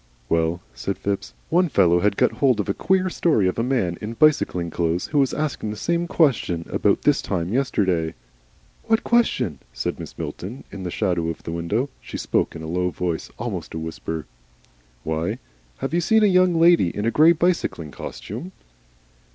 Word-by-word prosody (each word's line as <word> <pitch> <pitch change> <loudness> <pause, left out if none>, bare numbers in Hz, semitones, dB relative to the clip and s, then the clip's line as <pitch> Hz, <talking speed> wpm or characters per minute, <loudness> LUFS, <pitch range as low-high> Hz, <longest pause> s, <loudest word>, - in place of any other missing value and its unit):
"Well," 85 +1 +1
said 100 - -3
Phipps. 100 -1 -3 0.2
"One 175 +1 +3
fellow 90 - +4
had 100 +1 +1
got - - +3
hold 130 -6 +2
of 105 - -1
a 100 - +1
queer 185 - +1
story 155 - +2
of 95 - -1
a - - +1
man 115 -10 0
in 105 +2 -4
bicycling 115 - +2
clothes, 85 +2 0
who 145 - 0
was 135 -2 +3
asking 150 -8 -2
the 105 - -4
same 170 +5 0
question 115 - +1
about - - +2
this - - +3
time 85 0 -2
yesterday." 95 -11 +1 0.7
"What 225 0 +2
question?" 130 - +1
said - - -3
Mrs. - - -9
Milton, 110 +9 -6
in 100 - -7
the 90 - -3
shadow 85 -1 0
of 80 - -6
the - - -5
window. 85 +10 -1
She - - -7
spoke - - 0
in 80 - -7
a - - -5
low 90 +2 0
voice, 85 -2 -3
almost - - -5
a - - -2
whisper. 80 0 -5 0.8
"Why 80 +8 -2 0.4
Have - - -4
you 175 - +2
seen 220 +6 +4
a - - +7
young 185 -3 +4
lady 170 - +5
in 105 +5 -4
a 115 - +2
grey 155 +5 +6
bicycling 165 - 0
costume?" 135 - -7
105 Hz, 185 wpm, -23 LUFS, -, 0.8 s, a